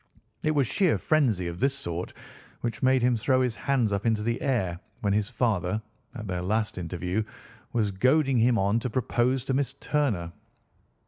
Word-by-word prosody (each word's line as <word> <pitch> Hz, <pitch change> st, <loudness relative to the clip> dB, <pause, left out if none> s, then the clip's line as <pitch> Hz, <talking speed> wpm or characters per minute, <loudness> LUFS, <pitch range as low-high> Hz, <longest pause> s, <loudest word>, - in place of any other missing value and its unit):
It 155 Hz, -, 0 dB
was 140 Hz, -2 st, +3 dB
sheer 185 Hz, -, +2 dB
frenzy 125 Hz, -, +2 dB
of 85 Hz, 0 st, -5 dB
this 135 Hz, +2 st, +2 dB
sort 85 Hz, -10 st, -4 dB, 0.5 s
which 115 Hz, -2 st, -3 dB
made 130 Hz, -1 st, +3 dB
him 125 Hz, 0 st, +4 dB
throw 130 Hz, +4 st, +2 dB
his 125 Hz, -3 st, -1 dB
hands 125 Hz, -7 st, +1 dB
up 100 Hz, 0 st, -1 dB
into 110 Hz, -2 st, +1 dB
the 115 Hz, +2 st, -1 dB
air 95 Hz, -11 st, 0 dB, 0.2 s
when 100 Hz, -1 st, +1 dB
his 105 Hz, +1 st, 0 dB
father, 105 Hz, -6 st, 0 dB, 0.4 s
at 110 Hz, -3 st, -6 dB
their 90 Hz, -3 st, -3 dB
last 105 Hz, +1 st, -1 dB
interview, 90 Hz, +3 st, -2 dB, 0.5 s
was 110 Hz, -4 st, +1 dB
goading 130 Hz, +6 st, +3 dB
him 120 Hz, +1 st, +4 dB
on 100 Hz, +3 st, +2 dB
to 125 Hz, -, -3 dB
propose 125 Hz, +1 st, 0 dB
to 135 Hz, -, -1 dB
Miss 135 Hz, 0 st, 0 dB
Turner. 130 Hz, -, -1 dB
115 Hz, 180 wpm, -27 LUFS, 100-130 Hz, 0.5 s, him